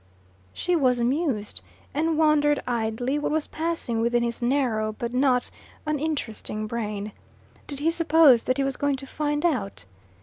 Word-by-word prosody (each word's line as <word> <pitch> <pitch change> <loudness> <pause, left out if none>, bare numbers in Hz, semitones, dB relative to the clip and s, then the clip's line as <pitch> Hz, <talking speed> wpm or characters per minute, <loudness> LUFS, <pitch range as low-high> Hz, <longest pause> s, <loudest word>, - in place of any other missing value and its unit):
She 355 0 -1
was 255 -6 +2
amused, 245 -4 -1 0.3
and 315 +2 0
wondered 300 -2 +3
idly 245 +3 -1
what 295 - -2
was 310 0 0
passing 320 -8 -2
within 235 +1 +2
his 235 +1 -3
narrow 240 -4 0
but 235 +2 -5
not 250 -1 +2 0.3
uninteresting 290 -8 -2
brain. 210 -2 -4 0.6
Did 285 - -6
he 325 +2 +2
suppose 320 -7 +5
that 255 - +1
he 275 - +1
was 270 -1 -2
going 285 -1 +1
to 270 +1 -7
"find 295 +2 -2
out"? 200 - -1
265 Hz, 155 wpm, -25 LUFS, 235-300 Hz, 0.6 s, suppose